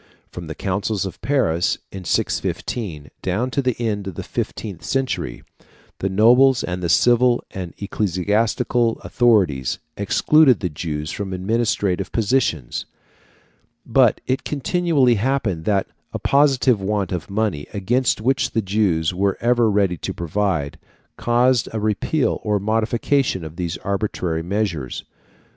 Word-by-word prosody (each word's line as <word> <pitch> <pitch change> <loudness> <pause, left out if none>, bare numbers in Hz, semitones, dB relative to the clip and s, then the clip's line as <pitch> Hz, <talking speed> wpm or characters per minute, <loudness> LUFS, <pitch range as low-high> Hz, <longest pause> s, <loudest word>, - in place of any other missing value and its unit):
From 85 -2 -8
the 80 - -6
Councils 100 +1 -2
of 95 - -7
Paris, 90 - +1
in 95 -2 -8
615, 80 -3 -2
down 110 +8 -1
to 140 - 0
the 125 -3 -1
end 105 -4 -2
of 95 - -6
the - - -5
fifteenth 100 -6 -5
century, 130 - -2 0.6
the 95 - -1
nobles 120 +6 +5
and 90 0 -3
the 85 - -1
civil 120 +5 +4
and 90 -3 -6
ecclesiastical 105 +4 0
authorities 95 - +2 0.2
excluded 130 +5 +4
the 90 - -2
Jews 75 0 -4
from 100 -2 -4
administrative 100 -1 0
positions; 105 - 0 1.0
but 120 -1 +3
it 130 +2 -1
continually 150 -3 +2
happened 110 -10 -1
that 100 -2 +2 0.3
a - - -1
positive 135 -5 +3
want 100 -1 -1
of 90 0 -4
money, 100 -7 -1
against 115 +4 0
which 130 +3 +1
the 115 - +1
Jews 95 -5 +1
were 100 +2 0
ever 120 -1 +3
ready 100 -4 +1
to - - -5
provide, 85 -4 -1 0.4
caused 120 +1 +2
a 110 - -3
repeal 110 +7 0
or 105 -2 0
modification 115 - 0
of 80 +1 -9
these 85 -2 -3
arbitrary 95 -5 -2
measures. 90 - -2
105 Hz, 135 wpm, -21 LUFS, 90-120 Hz, 1.0 s, nobles